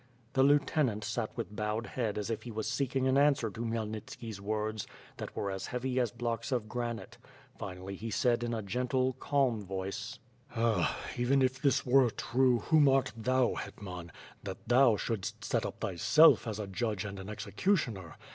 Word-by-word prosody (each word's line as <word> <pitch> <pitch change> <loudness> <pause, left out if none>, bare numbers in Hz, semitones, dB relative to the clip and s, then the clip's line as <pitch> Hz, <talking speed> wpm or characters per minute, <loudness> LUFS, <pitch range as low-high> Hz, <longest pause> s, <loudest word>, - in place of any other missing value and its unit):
The 130 - +3
lieutenant 140 -5 +3
sat 110 +1 -2
with 105 - -4
bowed 105 +2 -2
head 115 -5 -2
as 105 +2 -2
if 110 - -2
he 120 - -8
was 110 -1 -3
seeking 130 +2 0
an 130 +1 +4
answer 140 -6 +3
to 110 - -7
Khmyelnitski's 110 -1 -4
words, 110 +1 -2 0.3
that - - -7
were 100 - -2
as 95 0 -4
heavy 125 +1 -1
as 120 -2 +2
blocks 120 +2 -3
of 120 -4 0
granite; 120 0 -4 0.4
finally 95 0 -6
he 110 +4 -5
said 120 +2 +2
in 120 - -2
a 110 -2 -2
gentle, 125 +5 0
calm 135 -8 +1
voice: 95 +2 -5 0.4
"Ah! 115 -1 +1 0.2
even 130 +3 +3
if 130 +1 0
this 140 - +2
were 130 -1 +5
true, 125 +1 +2
whom 155 -3 +5
art 135 0 +2
thou, 125 +2 +2
Hetman, 90 -4 -7 0.3
that 100 +4 -8
thou 120 -2 +5
shouldst 110 0 -3
set - - 0
up - - -9
thyself 120 - +5
as 110 -2 -3
a 105 - -3
judge 105 +1 -2
and 100 -1 -6
an 95 +2 -7
executioner? 110 - -1
115 Hz, 175 wpm, -31 LUFS, 105-130 Hz, 0.4 s, were